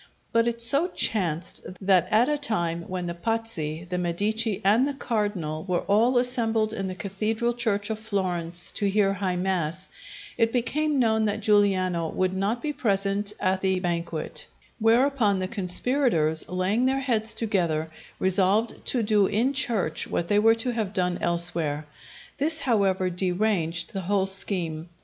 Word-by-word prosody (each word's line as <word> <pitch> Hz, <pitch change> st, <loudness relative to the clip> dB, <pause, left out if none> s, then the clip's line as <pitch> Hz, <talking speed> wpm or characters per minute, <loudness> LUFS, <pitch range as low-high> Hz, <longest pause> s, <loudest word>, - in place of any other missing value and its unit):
But 230 Hz, 0 st, +3 dB
it 235 Hz, 0 st, -2 dB
so 280 Hz, +9 st, +2 dB
chanced 180 Hz, -, -1 dB, 0.2 s
that 190 Hz, -2 st, +3 dB
at 225 Hz, +3 st, +4 dB
a 300 Hz, -, +1 dB
time 170 Hz, -, -2 dB
when 185 Hz, -1 st, -3 dB
the 170 Hz, -, -3 dB
Pazzi, 175 Hz, -5 st, -3 dB
the 180 Hz, 0 st, -2 dB
Medici, 205 Hz, +4 st, 0 dB
and 225 Hz, +7 st, +4 dB
the 285 Hz, -, -3 dB
Cardinal 205 Hz, -, -2 dB
were 180 Hz, -2 st, 0 dB
all 230 Hz, +5 st, +3 dB
assembled 230 Hz, -3 st, 0 dB
in 195 Hz, -3 st, -3 dB
the 185 Hz, -, -5 dB
cathedral 215 Hz, +5 st, -2 dB
church 220 Hz, -3 st, -1 dB
of 215 Hz, -, -3 dB
Florence 180 Hz, -5 st, -1 dB
to 200 Hz, -2 st, -1 dB
hear 195 Hz, -1 st, +2 dB
High 190 Hz, -2 st, -2 dB
Mass, 180 Hz, -1 st, -2 dB, 0.5 s
it 230 Hz, -1 st, +3 dB
became 290 Hz, +5 st, 0 dB
known 220 Hz, -3 st, +2 dB
that 210 Hz, +1 st, -1 dB
Giuliano 185 Hz, -5 st, +2 dB
would 185 Hz, +2 st, -1 dB
not 200 Hz, +5 st, -1 dB
be 300 Hz, -1 st, -2 dB
present 200 Hz, -3 st, 0 dB
at 185 Hz, -1 st, 0 dB
the 190 Hz, -1 st, +1 dB
banquet; 170 Hz, -3 st, -3 dB, 0.3 s
whereupon 230 Hz, -2 st, +3 dB
the 185 Hz, 0 st, -1 dB
conspirators, 185 Hz, -, 0 dB
laying 190 Hz, +7 st, +1 dB
their 270 Hz, +1 st, +1 dB
heads 225 Hz, -5 st, 0 dB
together, 170 Hz, -8 st, 0 dB, 0.3 s
resolved 195 Hz, +4 st, +1 dB
to 245 Hz, -3 st, +1 dB
do 210 Hz, -2 st, +3 dB
in 245 Hz, +6 st, +1 dB
church 210 Hz, -, -1 dB
what 170 Hz, -, -2 dB
they 205 Hz, -, +4 dB
were 225 Hz, +2 st, +5 dB
to 245 Hz, +2 st, -1 dB
have 220 Hz, -4 st, -2 dB
done 180 Hz, -2 st, 0 dB
elsewhere. 170 Hz, -3 st, 0 dB, 0.5 s
This, 315 Hz, +3 st, +1 dB
however, 195 Hz, -6 st, +1 dB
deranged 180 Hz, -2 st, -1 dB
the 195 Hz, -, -3 dB
whole 190 Hz, +1 st, +1 dB
scheme. 175 Hz, -4 st, -1 dB
200 Hz, 160 wpm, -25 LUFS, 180-225 Hz, 0.5 s, were